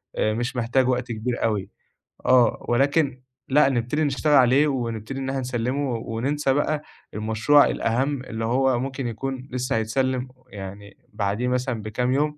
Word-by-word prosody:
آآ 110 - +1
مش 120 +4 -3
محتاج 125 +2 +1
وقت 125 -1 -1
كبير 120 +2 -3
أوي. 100 -3 0 0.6
آه، 125 -2 +4
ولكن 135 +1 +2 0.3
لأ 140 0 +5
نبتدي 125 +4 0
نشتغل 150 +1 +1
عليه 135 +2 +5
ونبتدي 120 -1 -3
إن 135 0 -3
إحنا 135 0 -1
نسلِّمه 130 +2 -1
وننسى 130 +6 -1
بقى 145 +1 0 0.3
المشروع 110 +7 +4
الأهَم 130 +4 0
اللي 115 -3 -4
هو 130 +1 +2
ممكن 135 0 -3
يكون 130 +3 -5
لسّه 125 -1 -1
هيتسلِّم 130 +3 0 0.2
يعني 100 0 -9 0.2
بعديه 105 +3 -1
مثلًا 125 -2 -1
بكام 125 +4 -1
يوم 150 +2 0
125 Hz, 150 wpm, -24 LUFS, 115-135 Hz, 0.6 s, لأ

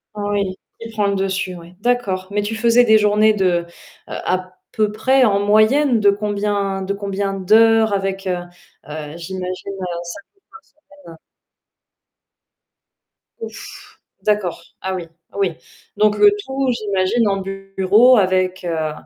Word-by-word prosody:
Oui, 205 -2 -2 0.2
qui 230 0 -8
prend 210 -2 0
le 200 - 0
dessus, 190 -1 -2
oui. 170 +1 -13
D'accord, 205 -6 -1
mais 205 0 -1
tu 220 +2 -3
faisais 235 +2 +4
des 220 -1 +6
journées 210 +1 +4
de, 180 -4 +1
heu, - - -20 0.4
à 185 0 -3 0.2
peu 215 -2 0
près, 260 +5 +2
en 200 -3 +2
moyenne, 220 +5 +3
de 200 -1 +5
combien 200 -1 -2
de 200 +1 -2
combien 200 0 -3
d'heures? 220 +3 +4
Avec, 195 -1 -2
heu, 180 -1 0 0.5
heu, 150 +1 -7
j'imagine, 185 +2 -6
heu, 190 -1 -6 0.2
5 175 - -8
jours 395 - -38
par 445 0 -15
semaine. 290 - -17 2.2
Ouf! 455 - -8 0.5
D'accord. 210 -5 0 0.2
Ah 190 0 -3
oui, 175 -2 -4 0.3
oui, 195 -3 0 0.4
donc 210 0 +3
le 415 - +8 0.2
tout 265 0 -2
j'imagine 210 0 0
en 195 -1 +1
bureau 195 +5 +3
avec, 185 -1 +1
heu, 160 -2 -1
200 Hz, 145 wpm, -19 LUFS, 185-220 Hz, 2.2 s, le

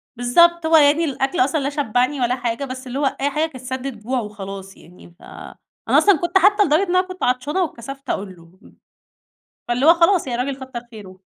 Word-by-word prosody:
بالضبط 340 +8 +3
هو 320 0 +5
يعني 295 +2 +4
الأكْل 270 +2 -2
أصلًا 285 +5 +2
لا 280 0 -2
شبّعني 265 -1 -1
ولا 245 +1 +1
حاجة، 245 +2 -3
بس 260 0 -8
اللي 260 +3 -4
هو 290 - 0 0.2
أي 285 - +1
حاجة 305 +3 0
كانت 255 -3 -12
سدّة 260 +1 -4
جوع 245 +2 -4
وخلاص 195 -2 -8
يعني، 175 +1 -17
ف - - -24
أنا - - -5
أصلًا 400 -5 +5
كنت 345 +2 +1
حتّى 410 +2 +4
لدرجة 315 +2 +2
إن 360 - -1
انا 365 - +5
كنت 370 0 -8
عطشانة 255 +8 0
واتكسفت 275 -1 -8
أقول 190 -2 -4
له. 170 +2 -20 1.1
فاللي 250 +5 0
هو 335 - +8
خلاص 340 -1 +2
يعني 245 -1 -2
راجل 270 0 -5
كتر 255 -2 -7
خيره. 195 -4 -13
265 Hz, 205 wpm, -20 LUFS, 240-315 Hz, 1.1 s, هو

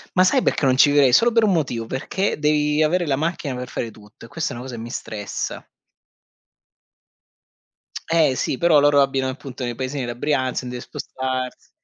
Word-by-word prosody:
Ma 185 0 +5
sai 260 +8 +3
perché 150 - +1
non 130 -1 +4
ci 140 +3 +6
vivrei? 140 -3 +4
Solo 235 - +5
per 230 -1 +3
un 200 - +3
motivo, 130 -9 -1
perché 150 - -2
devi 150 0 +2
avere 175 +2 +1
la 140 - +2
macchina 155 -2 -2
per 125 0 -6
fare 115 - -4
tutto, 105 +1 -16
e - - -12
questa 160 +6 -3
è - - -6
una 125 - -7
cosa 130 -2 -7
che 115 - -7
mi 115 - -7
stressa. 105 -3 -5 2.4
Eh 160 -5 +3
sì, 130 - -1
però 170 -1 +5
loro 145 0 +5
abitano 135 -1 0
appunto 130 -1 -8
nei 120 -1 -3
paesini 130 +3 -3
della 120 0 -5
Brianza, 130 -2 0
se - - -10
deve 125 0 -6
spostarsi, 130 -1 -5
135 Hz, 200 wpm, -22 LUFS, 125-155 Hz, 2.4 s, ci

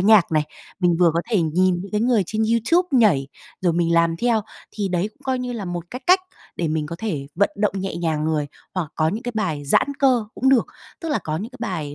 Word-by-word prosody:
nhạc 200 -3 +5
này, 155 -1 +3 0.4
mình 175 -2 +3
vừa 170 -2 +6
có 170 - +2
thể 200 -6 +3
nhìn 180 +3 +2
những 200 +2 -10
cái 210 - +1
người 235 -3 +3
trên 220 +3 -1
YouTube 235 +11 +2
nhảy, 165 -12 +4 0.3
rồi 175 -3 +2
mình 170 0 +1
làm 170 0 +3
theo, 230 +2 +1 0.3
thì 205 -2 -3
đấy 180 +3 0
cũng 215 - -27
coi 260 -1 0
như 250 0 -3
là 225 -4 -4
một 175 -2 -4
cái 250 - -6
cách 370 +1 +6 0.4
để 165 -2 -1
mình 155 -1 -1
có 170 - -6
thể 160 -11 -3
vận 200 - +2
động 210 -1 +1
nhẹ 190 -3 -3
nhàng 160 -3 -1
người, 155 -2 0 0.3
hoặc 180 -5 -2
có 155 0 +2
những 215 +8 -3
cái 245 -1 -4
bài 155 -9 -2
giãn 140 - +3
cơ 255 -5 +3
cũng 265 - +1
được. 265 -3 +4 0.3
Tức 330 - -4
là 295 - +1
có 155 0 -3
những 215 +7 -5
cái 255 - -13
bài 160 -10 -3
190 Hz, 250 wpm, -22 LUFS, 165-230 Hz, 0.4 s, vừa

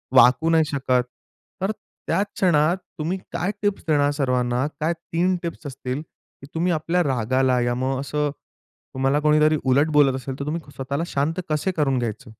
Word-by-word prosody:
वाकू 130 +6 +6
नाही 160 -1 +5
शकत. 130 -3 +1 0.6
तर 195 +3 +1 0.4
त्याच 190 +5 +2
क्षणात 170 -1 +3 0.2
तुम्ही 170 +5 -1 0.2
काय 185 +5 0
टिप्स 205 -1 0
देणार 145 -2 +3
सर्वांना, 125 -2 0
काय 160 +3 +1
3 170 +2 -1
टिप्स 165 -3 -5
असतील, 130 +1 -4
की 145 -3 -18
तुम्ही 175 +2 +1
आपल्या 165 +3 +1
रागाला 130 -1 +1
या 120 0 0
मग 130 +1 -1
असं, 150 +1 -1 0.6
तुम्हाला 135 +2 +1
कोणीतरी 155 +1 +4
उलट 135 +4 +3
बोलत 140 -3 +4
असेल, 130 +1 -5
तर 140 - -3
तुम्ही 160 +3 -2
स्वतःला 140 +4 -2
शांत 160 +6 0
कसे 155 +5 0
करून 135 -4 +2
घ्यायचे? 110 -1 -4
145 Hz, 165 wpm, -23 LUFS, 130-165 Hz, 0.6 s, वाकू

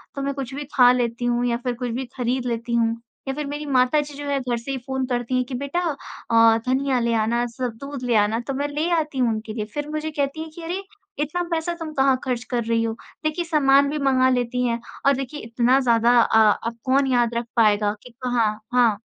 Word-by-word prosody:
तो 275 - -3
मैं 280 0 -1
कुछ 270 -2 -5
भी 290 - -4
ख़ा 245 -1 +7
लेती 240 -1 -1
हूँ 240 0 +1
या 235 0 +1
फ़िर 245 0 -3
कुछ 245 0 -4
भी 255 +3 -3
ख़रीद 250 +1 -1
लेती 235 0 -3
हूँ 230 -1 +2 0.3
या 270 - -1
फ़िर 295 +1 -4
मेरी 295 +1 -5
माताजी 285 +2 +2
जो 290 - -6
है 280 -1 0
घर 245 -2 -2
से 235 +4 -6
ही 265 - -2
फ़ोन 265 -1 -2
करती 245 0 -1
हैं 255 - +2
कि 255 - -9
बेटा 280 +6 -2 0.5
अ, 225 0 +6
धनिया 260 0 +1
ले 235 0 0
आना 230 +2 +1
सब 245 0 -4
दूध 275 -2 -6
ले 240 -2 +1
आना 210 +2 +3
तो 275 - -1
मैं 285 +2 -1
ले 300 +4 -2
आती 300 -3 -4
हूँ 245 -2 +3
उनके 215 0 -5
लिए 215 -2 -3
फ़िर 295 0 -4
मुझे 310 +1 -3
कहती 285 +2 -2
हैं 320 - -6
कि 340 - -9
अरे! 360 +4 -3 0.4
इतना 350 +4 -2
पैसा 335 +1 -1
तुम 315 -1 -5
कहाँ 270 -1 +3
ख़र्च 250 -2 -2
कर 240 -2 0
रही 230 0 +1
हो, 225 -1 -1 0.3
देखिए 310 +3 -1
सामान 280 -3 +4
भी 300 - -2
मँगा 260 -2 +3
लेती 250 0 0
हैं 235 0 -1 0.3
और 275 -1 +5
देखिए 270 +3 -5
इतना 240 +3 +2
ज़्यादा 235 -1 +4
अ 220 0 +4 0.3
अब 230 0 -5
कौन 270 +1 +3
याद 240 -1 +2
रख 235 0 -1
पाएगा 210 -2 +3
कि 245 - -12
कहाँ 235 -4 +1 0.2
हाँ। 230 -5 +4
255 Hz, 240 wpm, -23 LUFS, 235-280 Hz, 0.5 s, ख़ा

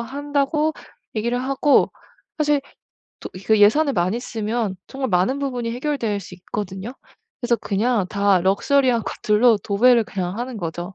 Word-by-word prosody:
한다고 285 +4 -1 0.4
얘기를 235 +3 -1
하고 275 +2 +2 0.5
사실 295 -2 +2 0.6
또 - - -7
이 185 - -8
그 220 -1 +4
예산을 280 +8 +5
많이 185 +5 0
쓰면 220 -3 -3
정말 265 -1 -3
많은 185 +10 +1
부분이 250 -4 -3
해결될 245 -5 -2
수 185 - -10
있거든요. 195 +4 -6 0.5
그래서 240 -1 +1
그냥 220 0 0
다 200 -2 +2
럭셔리한 235 +6 +2
것들로 215 +1 +2
도배를 230 +4 +3
그냥 185 -1 -4
하는 245 0 -5
거죠. 175 0 -5
230 Hz, 315 characters per minute, -21 LUFS, 200-265 Hz, 0.6 s, 예산을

